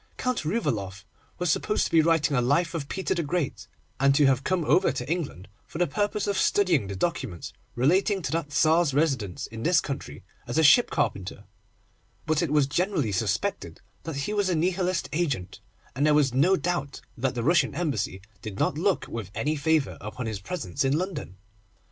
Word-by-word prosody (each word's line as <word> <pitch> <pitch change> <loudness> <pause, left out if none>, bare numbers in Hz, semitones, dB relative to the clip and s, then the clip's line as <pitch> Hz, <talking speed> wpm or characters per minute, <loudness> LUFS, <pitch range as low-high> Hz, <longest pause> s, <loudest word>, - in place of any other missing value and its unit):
Count 255 -6 -1
Rouvaloff 105 - -2 0.3
was 180 -2 +1
supposed 210 - +1
to - - -4
be 165 -1 +6
writing 155 -3 +2
a 125 - +3
life 145 +8 +1
of 150 -4 -4
Peter 190 - -1
the 170 - -1
Great, 160 -1 -3 0.3
and 140 +1 +4
to 145 - +5
have 135 -1 +3
come 185 -1 0
over 185 +5 +3
to 130 -2 -5
England 150 - -3 0.2
for - - -8
the 175 - +3
purpose 205 +5 -1
of 200 -1 0
studying 175 - +2
the 100 - -5
documents 125 - -3 0.2
relating 185 - +2
to - - -3
that 165 -2 -2
Tsar's 155 +1 +3
residence 130 - 0
in 110 0 -8
this 170 +6 +4
country 140 -4 -6 0.2
as 120 - -3
a 160 - +4
ship 240 - +6
carpenter; 100 - -2 0.8
but 155 -1 +1
it 170 - 0
was 150 -1 +3
generally 160 - 0
suspected 90 - -2 0.2
that 160 -3 -6
he 140 +9 -2
was 205 -2 +1
a 180 - +1
Nihilist 180 -1 0
agent, 145 - -2 0.4
and 140 - 0
there 150 0 +4
was 140 -4 +3
no 160 +9 +4
doubt 175 -7 -3
that 130 +1 -2
the 120 - -2
Russian 165 0 +2
Embassy 130 - -2 0.2
did 105 -3 -7
not 145 - 0
look 190 +2 +1
with 110 -5 -6
any 150 +2 0
favour 155 -1 0
upon 110 +4 -6
his 110 -3 -4
presence 120 - -3
in 135 +2 +2
London. 165 - -4
150 Hz, 190 wpm, -26 LUFS, 130-175 Hz, 0.8 s, be